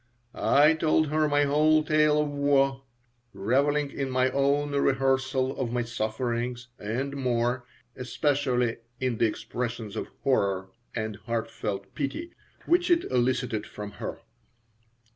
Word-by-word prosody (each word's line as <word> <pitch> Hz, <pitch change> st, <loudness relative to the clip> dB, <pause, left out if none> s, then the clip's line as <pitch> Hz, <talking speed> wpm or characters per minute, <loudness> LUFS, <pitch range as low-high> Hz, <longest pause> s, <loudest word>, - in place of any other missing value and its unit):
I 150 Hz, +3 st, +5 dB
told 155 Hz, -1 st, +2 dB
her 155 Hz, 0 st, +2 dB
my 145 Hz, 0 st, +3 dB
whole 155 Hz, +2 st, +4 dB
tale 150 Hz, 0 st, +3 dB
of 150 Hz, -1 st, +1 dB
woe, 140 Hz, -1 st, +2 dB, 0.5 s
reveling 140 Hz, +8 st, +1 dB
in 135 Hz, -1 st, -3 dB
my 130 Hz, 0 st, +2 dB
own 140 Hz, +2 st, +1 dB
rehearsal 135 Hz, -1 st, +1 dB
of 125 Hz, -3 st, -2 dB
my 120 Hz, 0 st, 0 dB
sufferings 120 Hz, +1 st, -3 dB
and 130 Hz, +7 st, -3 dB
more 120 Hz, -1 st, 0 dB, 0.3 s
especially 130 Hz, -2 st, 0 dB, 0.2 s
in 125 Hz, -3 st, -1 dB
the 115 Hz, -, +4 dB
expressions 115 Hz, -1 st, -4 dB
of -, -, -3 dB, 0.2 s
horror 100 Hz, -7 st, +1 dB, 0.3 s
and 110 Hz, -3 st, -3 dB
heartfelt 105 Hz, -4 st, -4 dB
pity 150 Hz, -, -4 dB, 0.3 s
which 350 Hz, +1 st, +3 dB
it 345 Hz, -1 st, +4 dB
elicited 125 Hz, -3 st, 0 dB
from 105 Hz, -1 st, -7 dB
her. -, -, -5 dB
130 Hz, 125 wpm, -27 LUFS, 120-145 Hz, 0.5 s, I